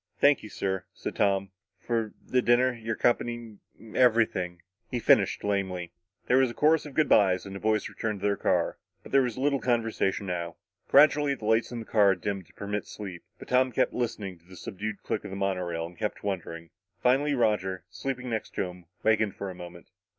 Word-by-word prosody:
"Thank 145 0 +5
you, 110 - -9
sir," 95 -2 -2
said - - -5
Tom, 100 -1 +1 0.3
"for 115 -3 -2
the 125 - +2
dinner 125 +1 +4
your 115 -2 -4
company 120 -2 -1 0.2
and 110 +1 -14
everything," 110 -8 +2 0.3
he 125 - -2
finished 105 -4 +3
lamely. 95 -4 -1 0.3
There 125 - +3
was 130 -1 +4
a 120 - -8
chorus 155 0 +3
of 140 - -12
good 155 -2 +3
byes 95 -3 +4
and 95 0 -7
the - - -5
boys 110 0 +1
returned 110 -3 -3
to - - -2
their 100 0 +2
car. - - 0 0.2
But - - -12
there 135 - +5
was 125 -3 -2
little 140 +1 +1
conversation 115 -5 0
now. 85 -2 -3 0.3
Gradually, 145 0 +5
the 110 - -9
lights 110 +2 +2
in 120 - -5
the - - -9
cars 100 -4 +4
dimmed 100 -4 -3
to - - -23
permit 105 0 -4
sleep. 95 -5 -7 0.2
But - - -12
Tom 130 0 +3
kept - - +1
listening 105 -7 -3
to 85 - -30
the 95 +1 -14
subdued 105 +2 -5
click - - -2
of - - -7
the 95 - -6
monorail 90 -4 -1
and 85 +1 -10
kept 105 +1 -4
wondering. 85 -4 -4 0.3
Finally 140 +4 +3
Roger, 95 -7 0
sleeping 130 +3 -4
next 110 - -4
to - - +1
him, 90 -1 -8 0.2
wakened 110 -2 +2
for 100 -1 -5
a - - -8
moment. 85 -1 -11
105 Hz, 205 wpm, -28 LUFS, 95-120 Hz, 0.3 s, Thank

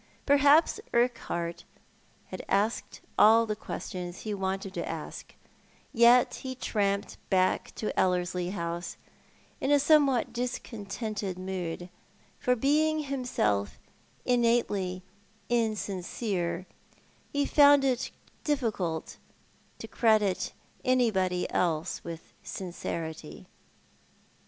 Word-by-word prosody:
Perhaps 285 +3 +5 0.2
Urquhart 200 -8 0 0.7
had - - -6
asked 205 +4 0 0.2
all 225 +2 +7
the 215 -1 -2
ques 210 - -6
tions 180 -2 -6
he 215 - -3
wanted 190 0 -3
to - - -4
ask, - - -7 0.6
yet 240 +2 +5
he 260 -1 -5
tramped 200 -5 -1
back 185 -1 +2
to 215 - -3
EUerslie 180 0 0
House 170 -2 -4 0.6
in - - -1
a 290 - +6
somewhat 280 -4 +3
discontented 215 -5 -4
mood, 180 -2 -4 0.5
for 250 - +2
being 305 +5 +2
himself 245 - -1 0.5
innately 230 -7 +1 0.5
insincere, 195 -5 -1 0.7
he 285 0 +1
found 285 -1 +6
it 260 -2 0 0.3
difficult 215 - -1 0.6
to - - -8
credit 215 -5 +2 0.3
anybody 195 -8 +2
else 165 -1 0
with 165 -1 -8
sincerity. 165 -4 -6
210 Hz, 95 wpm, -29 LUFS, 180-250 Hz, 0.7 s, all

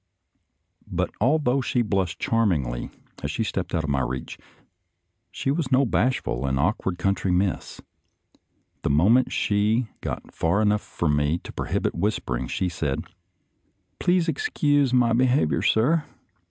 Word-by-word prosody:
But - - -1
although 135 +1 +2
she 125 -1 0
blushed 95 -5 -1
charmingly 80 - 0 0.3
as 75 - -3
she 90 +9 -1
stepped 95 -4 -3
out 80 - 0
of 75 - -3
my 70 - +1
reach, 65 +1 -4 0.9
she 135 - -2
was 145 -3 -2
no 130 +2 +4
bashful 115 - 0
and 65 0 0
awkward 90 - 0
country 95 +1 0
miss. 90 0 -1 1.0
The - - -1
moment 100 - +4
she 110 +3 +1
got - - -5
far 85 +5 +1
enough 105 -1 +2
from 75 -4 -1
me 75 +3 +1
to - - -9
prohibit - - -1
whispering, 65 - -2
she 90 - -1
said, 80 -3 -2 1.0
"Please 180 -1 +2
excuse 145 - +1
my 125 -2 +3
behavior, 125 - +2
sir. 150 +9 +3
105 Hz, 140 wpm, -24 LUFS, 80-125 Hz, 1.0 s, no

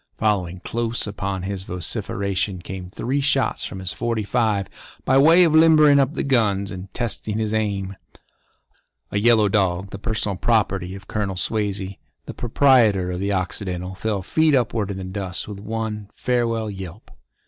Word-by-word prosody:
Following 95 -5 0
close 115 0 -2
upon 100 -2 -4
his 95 0 -3
vociferation 95 +2 -3
came 90 0 -7
three 130 +8 -2
shots 140 -1 +1
from 95 - -6
his 95 -1 -3
forty 115 -2 -1
five 105 -3 0 0.4
by 135 +1 +4
way 165 +5 +7
of 165 -3 +3
limbering 155 -3 +6
up 135 +3 +1
the - - -1
guns 105 -7 +1
and 95 0 -8
testing 110 -2 -3
his 110 -1 -1
aim. 100 -3 -1 1.2
A 100 - 0
yellow 110 -1 +5
dog, 95 -2 0
the 100 - -7
personal 105 -3 -2
property 95 -5 +1
of 95 0 -12
Colonel 100 -3 -2
Swazey, 100 -1 -2 0.3
the - - -7
proprietor 115 -7 +3
of 90 - -4
the 100 +1 -1
Occidental, 90 -1 -3
fell 100 0 -2
feet 155 - +3
upward 115 -5 0
in 100 - -4
the 95 - -5
dust 95 -1 -5
with 105 -2 -7
one 105 -1 -4
farewell 115 -3 0
yelp. 95 +1 -9
105 Hz, 160 wpm, -22 LUFS, 95-115 Hz, 1.2 s, way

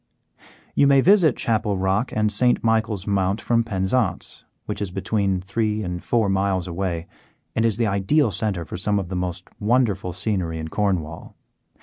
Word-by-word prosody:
You 140 - +4
may 140 -1 +5
visit 175 - +4
Chapel 105 -3 0
Rock 95 +6 0
and 105 -1 +1
St. 125 +2 +2
Michael's 110 -3 +1
Mount 100 0 0
from 115 +1 +1
Penzance, 100 +1 -1 0.2
which - - -4
is 100 - -2
between 95 0 -1
three 105 +2 -1
and 90 -2 -5
four 115 -3 +1
miles 95 -2 0
away 85 -1 -3 0.5
and 110 - +1
is 110 -2 0
the 120 - +1
ideal 105 +7 +2
centre 100 -5 -2
for - - -6
some 105 +3 +1
of 95 -3 -3
the 95 - -4
most 90 0 -4
wonderful 105 -4 +1
scenery 90 -3 -2
in 80 0 -5
Cornwall. 85 -5 -2
100 Hz, 165 wpm, -23 LUFS, 95-110 Hz, 0.5 s, may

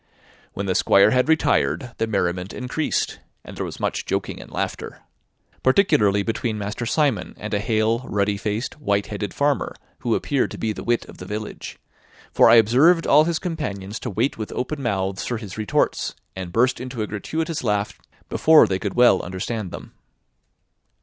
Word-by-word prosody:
When 100 - -4
the 95 - 0
Squire 100 - +5
had 125 +3 +2
retired, 120 - +2
the 115 - +1
merriment 90 -3 -1
increased, 130 +5 -2 0.3
and - - -10
there - - -3
was - - -7
much - - -2
joking - - -2
and - - -12
laughter, - - -4 0.6
particularly 105 - +3
between 115 0 -2
Master 105 +3 -4
Simon 140 -4 0
and 105 0 -6
a 100 - +1
hale, 110 +1 +1
ruddy 100 0 +1
faced, 105 +7 -3
white 100 -7 0
headed 105 -1 -4
farmer, 145 -1 0 0.2
who 120 -3 0
appeared 140 -3 0
to - - -8
be 110 -1 -1
the - - -7
wit 120 0 0
of - - -14
the - - -8
village; 105 0 -6 0.5
for - - +6
I 115 - +8
observed 135 +10 +5
all 150 +2 +6
his 170 -1 0
companions 105 - -4
to 125 - -5
wait 115 +5 -1
with 110 - -5
open 140 +3 -3
mouths 100 -5 -1
for 120 - -2
his 105 -5 -8
retorts, 110 -3 0 0.2
and 95 -2 -6
burst 125 +5 +2
into 125 -3 -4
a - - -1
gratuitous 160 - -3
laugh 105 -2 -1 0.3
before 160 -1 +6
they 95 -1 -1
could 100 -1 -4
well 120 -6 +5
understand 95 +3 -4
them. - - -10
110 Hz, 175 wpm, -22 LUFS, 100-130 Hz, 0.6 s, I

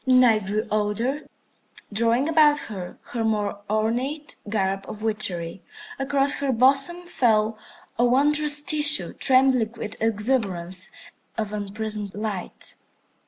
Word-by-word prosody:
The 260 - +1
Night 225 -6 +4
grew 210 +2 -2
older, 215 +7 -2 0.7
drawing 230 +5 +1
about 305 -2 +4
her 190 -9 -8 0.2
her 230 -2 -2
more 210 -2 -2
ornate 245 +8 -2
garb 195 -2 -1
of 215 0 -9
witchery. 190 -6 -1 0.4
Across 275 +1 +2
her 280 -1 -1
bosom 275 +8 +3
fell 220 -8 +1 0.4
a 240 - +4
wondrous 295 +3 +3
tissue, 295 - +4
trembling 255 -4 +2
with 210 -2 -7
exuberance 205 -6 -1 0.5
of 215 -2 -3
unprismed 210 0 -3
light. 205 -3 -6
225 Hz, 115 wpm, -23 LUFS, 210-270 Hz, 0.7 s, Night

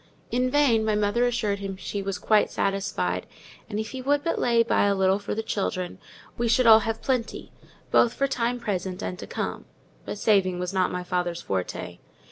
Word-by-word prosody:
In 250 +1 +1
vain 255 -5 +3
my 215 -1 +1
mother 210 +4 +2
assured 215 -4 -1
him 195 -1 -5
she 200 +2 -4
was 195 -1 -3
quite 215 -1 +3
satisfied; 195 0 -1 0.4
and 210 -1 -3
if 220 - -4
he 260 - -5
would 285 +2 +1
but 335 - -1
lay 235 -1 +3
by 230 - +2
a 200 0 +2
little 190 +1 +2
for 200 - -4
the 225 - -2
children, 185 -4 -3 0.4
we 240 - +1
should 235 +2 +3
all 220 -1 +9
have 225 +1 -3
plenty, 250 -4 -2 0.4
both 235 - +5
for 275 - +1
time 245 -2 -1
present 190 -4 -3
and 180 - -4
to - - -7
come: - - -4 0.4
but - - -5
saving 195 -4 +2
was 180 +1 -3
not 185 -1 +1
my 180 0 -3
father's 175 -1 -2
forte. 90 -2 -4
210 Hz, 200 wpm, -26 LUFS, 190-235 Hz, 0.4 s, all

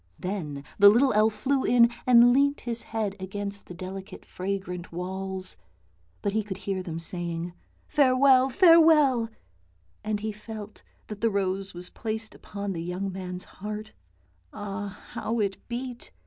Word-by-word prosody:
Then 160 -7 -4 0.2
the 200 0 +10
little 250 +5 +4
elf 215 +1 +4
flew 265 +5 0
in 235 -1 +5 0.2
and 245 -1 +7
leant 280 +2 +2
his 235 -1 -3
head 215 -3 -3
against 200 +1 -5
the 180 - -9
delicate 190 +1 -8
fragrant 185 -2 -4
walls, 185 - -4 0.7
but 200 - 0
he 220 - +2
could 200 -3 -6
hear 190 -1 -3
them 170 -3 -5
saying, 170 0 0 0.2
" - - -37
Farewell, 265 -2 +5
farewell," 310 - +6 0.7
and 215 -1 -1
he 215 0 -2
felt 215 0 -9 0.2
that 210 -1 -8
the 230 - +3
rose 195 -2 -2
was 180 +1 -6
placed 220 0 -4
upon 200 -1 -5
the 165 - -4
young 180 +3 -3
man's 180 -1 -5
heart 210 +2 -7 0.4
— 90 0 -38
ah, 200 0 -6
how 230 +1 -2
it 200 -2 0
beat! 245 0 -6
205 Hz, 155 wpm, -27 LUFS, 185-235 Hz, 0.7 s, the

